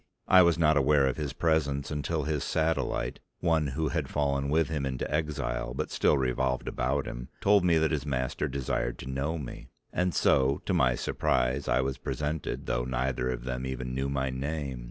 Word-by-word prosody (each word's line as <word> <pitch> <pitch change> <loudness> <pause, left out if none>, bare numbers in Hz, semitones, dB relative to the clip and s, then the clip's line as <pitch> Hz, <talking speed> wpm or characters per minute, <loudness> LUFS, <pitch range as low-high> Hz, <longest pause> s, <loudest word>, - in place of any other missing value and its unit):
I 95 - +8
was 85 -2 +4
not 80 -2 +4
aware 70 0 +4
of 65 - 0
his 75 -3 -2
presence 70 -2 0
until 75 +1 -1
his 75 -1 -1
satellite, 80 0 -1 0.2
one 80 -3 +2
who 75 +3 -1
had - - -2
fallen 70 -1 0
with 80 +1 +2
him 75 -3 -2
into 65 -2 -2
exile 65 -5 -2
but - - -3
still 75 - +3
revolved 65 0 0
about 65 +3 -1
him, - - -6
told 100 -1 +4
me 85 -2 +4
that 80 0 +2
his 75 -4 -1
master 65 -3 -1
desired 65 -2 -2
to - - -9
know 70 +5 -2
me; 70 -6 -8 0.2
and 90 -1 0
so 70 +2 +3
to - - 0
my 60 -1 +3
surprise 65 +4 0
I - - +3
was 65 0 -2
presented 75 0 -3
though - - 0
neither 65 0 -1
of 60 -1 -3
them 65 0 -3
even 65 -1 -4
knew 65 +1 -1
my 65 -1 -1
name. 70 -1 -3
70 Hz, 195 wpm, -29 LUFS, 65-75 Hz, 0.2 s, I